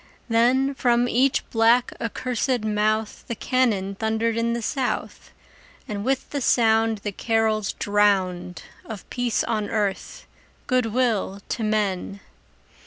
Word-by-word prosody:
Then 250 Hz, +4 st, +3 dB
from 245 Hz, -2 st, +2 dB
each 255 Hz, +3 st, +1 dB
black, 230 Hz, +2 st, +3 dB
accursed 250 Hz, +1 st, -1 dB
mouth 215 Hz, 0 st, -1 dB
The 235 Hz, -, -3 dB
cannon 215 Hz, -6 st, 0 dB
thundered 220 Hz, +2 st, -1 dB
in 230 Hz, 0 st, 0 dB
the 235 Hz, -, -2 dB
South, 265 Hz, -1 st, -3 dB, 0.6 s
And 205 Hz, -1 st, -4 dB
with 265 Hz, +2 st, -1 dB
the 285 Hz, -, -2 dB
sound 225 Hz, -2 st, +3 dB
The 205 Hz, -, -2 dB
carols 220 Hz, -1 st, 0 dB
drowned 190 Hz, -3 st, 0 dB, 0.2 s
Of 215 Hz, -3 st, -9 dB
peace 245 Hz, -2 st, 0 dB
on 215 Hz, -2 st, -2 dB
earth, 205 Hz, -3 st, -2 dB, 0.4 s
good 255 Hz, -3 st, +1 dB
will 220 Hz, -4 st, 0 dB
to 230 Hz, -, -2 dB
men! 200 Hz, -2 st, -1 dB
225 Hz, 125 wpm, -24 LUFS, 210-245 Hz, 0.6 s, Then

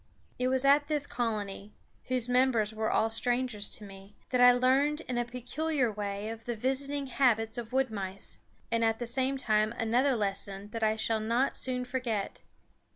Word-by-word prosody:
It 250 Hz, -, +1 dB
was 260 Hz, +1 st, +2 dB
at 285 Hz, +1 st, +5 dB
this 295 Hz, -2 st, 0 dB
colony, 210 Hz, -5 st, -3 dB, 0.3 s
whose 255 Hz, -2 st, -1 dB
members 245 Hz, -4 st, +2 dB
were 220 Hz, 0 st, -1 dB
all 225 Hz, 0 st, +2 dB
strangers 240 Hz, -2 st, 0 dB
to -, -, -10 dB
me, 195 Hz, 0 st, -12 dB, 0.2 s
that 250 Hz, -1 st, +2 dB
I 245 Hz, 0 st, +9 dB
learned 270 Hz, +5 st, +2 dB
in 250 Hz, -6 st, -3 dB
a 240 Hz, -, 0 dB
peculiar 250 Hz, +2 st, -1 dB
way 205 Hz, 0 st, -4 dB
of 225 Hz, 0 st, -8 dB
the 240 Hz, -, -2 dB
visiting 275 Hz, +4 st, -1 dB
habits 235 Hz, -4 st, +2 dB
of 235 Hz, -1 st, -4 dB
wood 265 Hz, -1 st, +1 dB
mice, 195 Hz, -2 st, -5 dB, 0.3 s
and 230 Hz, 0 st, +2 dB
at 225 Hz, 0 st, +2 dB
the 240 Hz, -, -4 dB
same 260 Hz, +3 st, 0 dB
time 215 Hz, -3 st, +1 dB
another 245 Hz, +4 st, +2 dB
lesson 200 Hz, -1 st, -2 dB
that 230 Hz, -, -5 dB
I 220 Hz, 0 st, +2 dB
shall 220 Hz, 0 st, 0 dB
not 235 Hz, +5 st, +1 dB
soon 250 Hz, -1 st, -2 dB
forget. 245 Hz, -5 st, -3 dB
240 Hz, 180 wpm, -30 LUFS, 215-260 Hz, 0.3 s, I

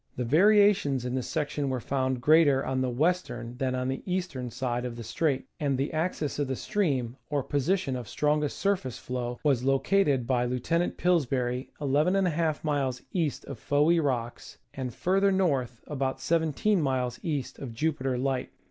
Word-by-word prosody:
The 125 Hz, -, -2 dB
variations 190 Hz, -, +4 dB
in 125 Hz, -, -2 dB
this 130 Hz, -1 st, -2 dB
section 145 Hz, -3 st, -1 dB
were 130 Hz, -1 st, -1 dB
found 130 Hz, 0 st, -1 dB
greater 145 Hz, -2 st, +5 dB
on 130 Hz, 0 st, -1 dB
the 130 Hz, -, 0 dB
western 125 Hz, -4 st, -1 dB
than 130 Hz, -1 st, -1 dB
on 130 Hz, 0 st, -1 dB
the 135 Hz, 0 st, -2 dB
eastern 165 Hz, -9 st, -2 dB
side 125 Hz, 0 st, -2 dB
of 125 Hz, -2 st, -4 dB
the 115 Hz, -, -7 dB
strait, 135 Hz, +4 st, -1 dB
and 140 Hz, -3 st, 0 dB
the 140 Hz, +4 st, -2 dB
axis 155 Hz, -3 st, -2 dB
of 145 Hz, -, 0 dB
the 130 Hz, -, -2 dB
stream, 135 Hz, -, -1 dB
or 145 Hz, -2 st, 0 dB
position 145 Hz, +1 st, 0 dB
of 120 Hz, -4 st, -6 dB
strongest 150 Hz, 0 st, 0 dB
surface 185 Hz, -, -1 dB
flow, 125 Hz, -1 st, -4 dB
was 135 Hz, -5 st, +2 dB
located 135 Hz, 0 st, +2 dB
by 125 Hz, -1 st, +1 dB
Lieutenant 125 Hz, +8 st, -1 dB
Pillsbury 130 Hz, -7 st, 0 dB
\\^ 160 Hz, +2 st, +1 dB
miles 140 Hz, -5 st, -1 dB
east 165 Hz, -6 st, -1 dB
of 135 Hz, -5 st, -8 dB
Fowey 150 Hz, +6 st, +3 dB
Rocks, 120 Hz, -4 st, -3 dB, 0.2 s
and, 130 Hz, -2 st, -4 dB
farther 195 Hz, -, +2 dB
north, 135 Hz, -11 st, 0 dB
about 135 Hz, -2 st, -2 dB
17 165 Hz, +6 st, +1 dB
miles 130 Hz, -3 st, -1 dB
east 145 Hz, -6 st, -3 dB
of 135 Hz, -4 st, -6 dB
Jupiter 135 Hz, 0 st, -1 dB
Light. 130 Hz, 0 st, -1 dB
135 Hz, 165 wpm, -28 LUFS, 125-160 Hz, 0.2 s, greater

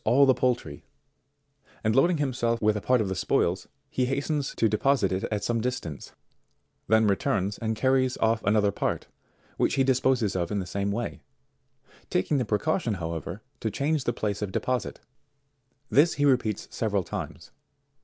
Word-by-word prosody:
all 140 Hz, +3 st, +5 dB
the 130 Hz, -, +5 dB
poultry, 120 Hz, -, -1 dB, 1.0 s
and 110 Hz, +1 st, +1 dB
loading 170 Hz, +6 st, +4 dB
himself 120 Hz, -5 st, 0 dB
with 110 Hz, -1 st, +2 dB
a 105 Hz, -, -2 dB
part 125 Hz, +3 st, +3 dB
of 105 Hz, -, -1 dB
the 95 Hz, -, -2 dB
spoils, 90 Hz, -, 0 dB, 0.2 s
he 125 Hz, -1 st, 0 dB
hastens 140 Hz, +1 st, -1 dB
to 115 Hz, -, +3 dB
deposite 110 Hz, -1 st, +2 dB
it 95 Hz, 0 st, -1 dB
at 105 Hz, -1 st, -3 dB
some 115 Hz, +1 st, 0 dB
distance, 120 Hz, -, -4 dB, 0.8 s
then 110 Hz, +1 st, +4 dB
returns, 100 Hz, 0 st, 0 dB
and 110 Hz, -1 st, -1 dB
carries 130 Hz, +1 st, +2 dB
off 110 Hz, 0 st, +1 dB
another 105 Hz, 0 st, +3 dB
part, -, -, -2 dB, 0.5 s
which -, -, +1 dB
he 135 Hz, -, +3 dB
disposes 130 Hz, -6 st, +2 dB
of 85 Hz, -2 st, -1 dB
in 105 Hz, -, -2 dB
the 95 Hz, -, -2 dB
same 100 Hz, +2 st, -2 dB
way, 115 Hz, +3 st, -4 dB, 0.9 s
taking 140 Hz, +11 st, +1 dB
the 125 Hz, -, 0 dB
precaution 115 Hz, -, 0 dB
however 85 Hz, +3 st, -5 dB, 0.2 s
to 110 Hz, -, -1 dB
change 145 Hz, +4 st, -1 dB
the -, -, +2 dB
place 105 Hz, -3 st, -3 dB
of 105 Hz, -2 st, -3 dB
deposite. 125 Hz, +4 st, -2 dB, 0.9 s
This 155 Hz, +5 st, +4 dB
he 145 Hz, -, +1 dB
repeats 125 Hz, -7 st, +1 dB
several 105 Hz, -4 st, 0 dB
times. -, -, -7 dB
110 Hz, 165 wpm, -27 LUFS, 100-130 Hz, 1.0 s, all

